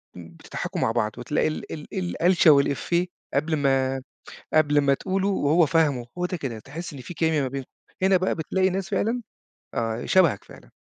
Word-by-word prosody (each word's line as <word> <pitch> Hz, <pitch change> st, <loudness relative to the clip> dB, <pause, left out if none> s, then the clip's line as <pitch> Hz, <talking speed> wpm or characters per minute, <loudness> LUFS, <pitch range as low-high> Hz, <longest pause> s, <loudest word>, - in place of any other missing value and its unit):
بتضحَكوا 85 Hz, -2 st, -6 dB
مع -, -, +2 dB
بعض 110 Hz, -2 st, 0 dB
وتلاقي 120 Hz, +4 st, 0 dB
ال 155 Hz, -, -5 dB
ال 150 Hz, -2 st, -8 dB
الألشة 180 Hz, -2 st, +3 dB
والإفّيه 145 Hz, +5 st, +2 dB, 0.3 s
قبْل 155 Hz, +3 st, +1 dB
ما 135 Hz, -2 st, +1 dB, 0.5 s
قبْل 150 Hz, -2 st, +4 dB
ما 140 Hz, -1 st, +3 dB
تقوله 190 Hz, +6 st, -1 dB
وهو 165 Hz, -3 st, +3 dB
فاهمه، 145 Hz, -6 st, +1 dB
هو 180 Hz, -, +1 dB
ده 180 Hz, -, -3 dB
كده، 135 Hz, -8 st, -5 dB
تحس 155 Hz, +10 st, -8 dB
إن 140 Hz, -, -9 dB
في 175 Hz, -, -8 dB
كيميا 160 Hz, -2 st, +1 dB
ما 130 Hz, -, -1 dB
بينكم، 135 Hz, 0 st, -6 dB, 0.3 s
هنا 190 Hz, 0 st, +5 dB
بقى 185 Hz, +1 st, +1 dB
بتلاقي 185 Hz, +4 st, 0 dB
ناس 190 Hz, 0 st, -3 dB
فعلًا، 235 Hz, +3 st, 0 dB, 0.5 s
آه 115 Hz, 0 st, -2 dB
شبَهك 170 Hz, -, +3 dB
فعلًا. -, -, -15 dB
155 Hz, 175 wpm, -25 LUFS, 135-180 Hz, 0.5 s, هنا